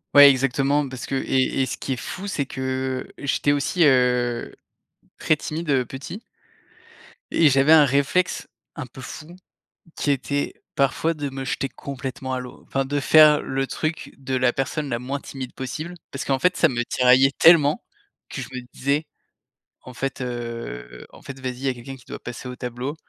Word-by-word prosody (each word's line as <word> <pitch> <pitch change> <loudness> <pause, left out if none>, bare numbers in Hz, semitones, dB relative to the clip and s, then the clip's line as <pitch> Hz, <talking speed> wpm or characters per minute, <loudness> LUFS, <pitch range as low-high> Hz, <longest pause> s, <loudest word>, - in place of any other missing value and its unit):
Ouais 145 0 +11
exactement 135 +2 +1
parce 130 -1 -6
que - - -6
et 135 0 +1
et - - +3
ce - - -4
qui 135 - -3
est - - -2
fou, 185 - -6
c'est 145 -9 -2
que 130 -1 -3
j'étais 140 +1 +1
aussi, 145 +5 +1
heu, 125 -3 +2 0.6
très 155 - +3
timide, 155 +2 -5
heu, 130 -3 +2
petit 140 - -8 1.1
et 160 -3 +5
j'avais 135 +3 +5
un 155 -2 +8
réflexe 140 +7 +1 0.3
un 145 -3 -6
peu 130 +2 -12
fou 155 +7 -9 0.6
qui - - -2
était 140 +1 -1 0.2
parfois 140 +4 +1
de 145 -3 -4
me 135 0 -6
jeter 135 0 -2
complètement 130 -1 -6
à 130 - -1
l'eau, 125 -1 -10
enfin 135 0 -1
de 145 +2 -1
faire 150 +1 +6
le 135 0 -2
truc 155 +1 -3
de 130 -1 -3
la 125 -1 +3
personne 140 +3 -2
la 120 - -1
moins 135 +3 -4
timide 130 -3 -8
possible. 155 +6 -5 0.2
Parce 140 - -5
qu'en 135 -1 +1
fait 180 +6 +2
ça 165 - +4
me 120 -2 -1
tiraillait 130 +2 +4
tellement, 155 -3 +6 0.5
que - - -5
je - - -6
me 130 -1 -5
disais: 140 +4 0 0.8
«En 125 - -11
fait, 135 +1 -3
heu, 115 - -6
en - - -15
fait 135 -1 -9
vas-y, 130 -1 -3
il 130 - -10
y - - 0
a - - 0
quelqu'un 125 +2 -9
qui 125 -3 -18
doit - - -8
passer 125 +1 -7
au 125 - -6
tableau, 125 +3 -5
135 Hz, 190 wpm, -23 LUFS, 130-145 Hz, 1.1 s, Ouais